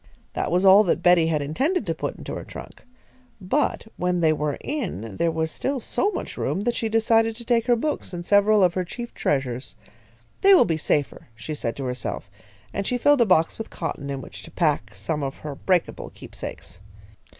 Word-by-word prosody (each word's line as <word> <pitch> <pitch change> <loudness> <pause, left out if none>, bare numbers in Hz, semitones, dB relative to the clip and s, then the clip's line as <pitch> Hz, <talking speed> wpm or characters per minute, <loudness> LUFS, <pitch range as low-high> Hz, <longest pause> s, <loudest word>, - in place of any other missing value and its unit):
That - - -2
was 180 +3 +2
all 195 +2 +8
that 175 - 0
Betty 175 -2 +5
had 155 -3 0
intended 275 - 0
to - - -1
put - - -4
into - - -7
her - - -5
trunk, - - -11 0.5
but 220 +10 0
when 180 0 0
they 160 -2 +4
were 150 -2 -2
in, 175 - -4
there 170 - +2
was 160 0 -1
still 270 - -2
so 395 - 0
much - - -5
room 195 - -1
that 240 +3 0
she 225 - -2
decided 225 0 +3
to 235 +1 -9
take 235 0 +1
her 240 - +5
books 295 0 -2
and 175 -1 -6
several 205 +1 +4
of 180 -2 +4
her 185 - -1
chief 235 +7 -7
treasures. 130 -3 -2 0.7
"They 395 0 +8
will 250 - +6
be 165 - 0
safer," 150 -2 -1
she 110 +7 -6
said 115 -6 -3
to 140 - -5
herself, 125 -5 -4 0.4
and 200 - -2
she 250 - 0
filled 285 +2 +4
a 235 - +4
box 165 -1 +3
with 225 - -5
cotton 145 -4 -5
in 135 -1 -3
which - - -10
to - - -12
pack 150 - 0
some 125 +11 -3
of 135 -1 -4
her 150 - -4
breakable 180 +4 -1
keepsakes. 90 - -9
180 Hz, 205 wpm, -24 LUFS, 150-225 Hz, 0.7 s, all